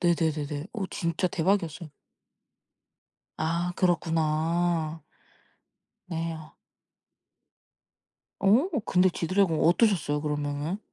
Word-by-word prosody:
네네네네. 155 -3 0
어 210 -5 -3
진짜 170 +1 -1
대박이었어요. 170 -2 0 1.5
아 170 +3 -1
그렇구나. 165 -1 0 1.0
네요. 165 -2 -5 1.9
어 225 - +4 0.2
근데 185 0 +4
지드래곤 180 -1 +1
어떠셨어요 170 -5 +3
그러면은? 150 +4 -2
165 Hz, 200 characters per minute, -27 LUFS, 155-180 Hz, 1.9 s, 어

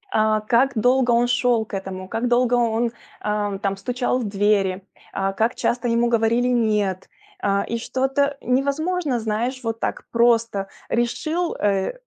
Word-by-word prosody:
э, 215 0 +3
как 255 +4 +3
долго 245 +2 +3
он 235 +1 +3
шел 240 -2 +2
к 210 - -18
этому, 190 -1 -5
как 225 +5 -2
долго 245 0 +3
он, 235 0 +1 0.4
э, 205 -2 -1
там 195 -1 -1
стучал 250 +4 -1
в 245 - -3
двери, 200 -2 +1 0.3
а, 195 0 -1
как 225 +5 0
часто 240 0 -1
ему 235 0 +2
говорили 230 +1 +2
"нет", 210 -6 0 0.3
э, 200 0 +1
и 235 - -2
что-то 270 +4 0
невозможно, 280 +2 0
знаешь, 230 +4 -2
вот 225 -1 -3
так - - -3
просто: 230 -4 +2 0.2
решил, 310 +9 -1
э, 195 -2 0
235 Hz, 155 wpm, -22 LUFS, 210-250 Hz, 0.4 s, э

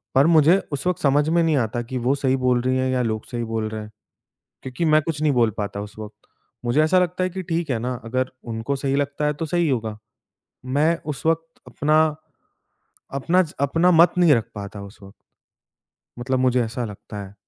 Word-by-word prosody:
पर 135 +3 +5
मुझे 165 +2 +5 0.2
उस 145 +5 -2
वक़्त 180 -2 -1
समझ 145 +1 +3
में 170 +1 +3
नहीं 160 -3 +2
आता 120 -1 -1
कि 130 - -2
वो 125 +3 +1
सही 135 -2 +1
बोल 125 -1 +2
रही 130 +1 0
हैं 130 0 0
या 130 -1 +1
लोग 110 -2 -2
सही 120 -1 -3
बोल 110 -1 -3
रहे 110 0 -5
हैं। 105 0 -10 0.7
क्योंकि 130 +6 -3
मैं 155 -1 +4
कुछ 155 -1 -4
नहीं 155 -1 +3
बोल 120 -3 +3
पाता 100 -1 -3
उस 105 +1 -9
वक़्त। 105 0 -11 0.4
मुझे 120 +6 +3
ऐसा 185 +4 +4
लगता 180 0 0
है 185 - 0
कि 185 +1 -6
ठीक 170 -2 -2
है 120 - 0
ना, 125 +2 -2
अगर 130 +3 -1
उनको 115 +4 -3
सही 135 0 -1
लगता 145 +1 -1
है 150 - +1
तो 150 +3 -4
सही 170 0 +1
होगा। 110 -5 -2 0.7
मैं 150 +6 +2
उस 150 0 -5
वक़्त 165 0 -1
अपना 155 +1 +2 1.1
अपना 170 +7 +2
च 160 - -8
अपना 165 +6 +3
मत 170 0 +6
नहीं 175 -4 +6
रख 115 -3 0
पाता 100 -1 -7
उस 100 +1 -12
वक़्त 100 0 -13 1.1
मतलब 130 +1 -1
मुझे 125 -1 +2
ऐसा 120 +2 -4
लगता 105 0 -9
है। 95 0 -12
135 Hz, 215 wpm, -22 LUFS, 115-160 Hz, 1.1 s, मत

